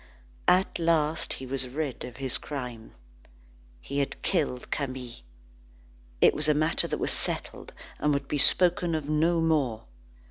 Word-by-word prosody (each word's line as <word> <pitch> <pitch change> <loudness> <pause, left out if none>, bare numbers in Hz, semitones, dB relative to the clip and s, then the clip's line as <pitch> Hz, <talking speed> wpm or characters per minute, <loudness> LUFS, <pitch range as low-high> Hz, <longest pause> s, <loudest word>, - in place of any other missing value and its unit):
At 185 0 +3
last 165 -1 +1
he 130 - -7
was 130 0 0
rid 140 +1 -4
of 125 - -8
his 130 -2 -1
crime. 125 -6 -7 0.9
He 140 +1 -3
had 140 - -2
killed 145 -9 -1
Camille. 130 -4 -4 1.0
It - - +6
was 150 0 +1
a 150 - +4
matter 155 +2 +2
that - - -2
was - - 0
settled, - - -2 0.3
and 150 - +2
would 140 -1 -1
be 145 - -1
spoken 175 +2 +4
of 155 -2 -3
no 160 +3 +2
more. 145 -9 +1
145 Hz, 150 wpm, -27 LUFS, 130-160 Hz, 1.0 s, It